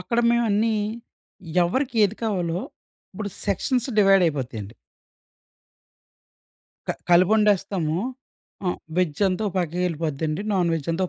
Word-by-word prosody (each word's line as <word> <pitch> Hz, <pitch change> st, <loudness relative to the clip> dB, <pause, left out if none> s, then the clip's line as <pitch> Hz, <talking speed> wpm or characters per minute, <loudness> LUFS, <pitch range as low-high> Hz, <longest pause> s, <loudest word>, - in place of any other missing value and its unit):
అక్కడ 235 Hz, -3 st, -2 dB
మేవన్నీ, 225 Hz, -1 st, +2 dB, 0.9 s
ఎవరికి 255 Hz, +6 st, -1 dB
ఏది 205 Hz, +2 st, -1 dB
కావాలో, 180 Hz, -6 st, -1 dB, 0.5 s
ఇప్పుడు 205 Hz, +1 st, -5 dB, 0.2 s
సెక్షన్స్ 245 Hz, +6 st, 0 dB
డివైడైయిపోతయండి. 150 Hz, -, +2 dB, 2.1 s
క -, -, +1 dB, 0.2 s
కలిపొండేస్తాము. 185 Hz, -3 st, +3 dB, 0.7 s
హ్మ్, 180 Hz, -2 st, -1 dB, 0.2 s
వెజ్జంతా 185 Hz, +4 st, +1 dB
ఓ -, -, -11 dB
పక్కకెళ్ళిపోద్దండి. 165 Hz, -1 st, -1 dB
నాన్ 175 Hz, -3 st, +2 dB
వెజ్జంతా 165 Hz, +4 st, -1 dB
185 Hz, 85 wpm, -24 LUFS, 165-210 Hz, 2.1 s, కలిపొండేస్తాము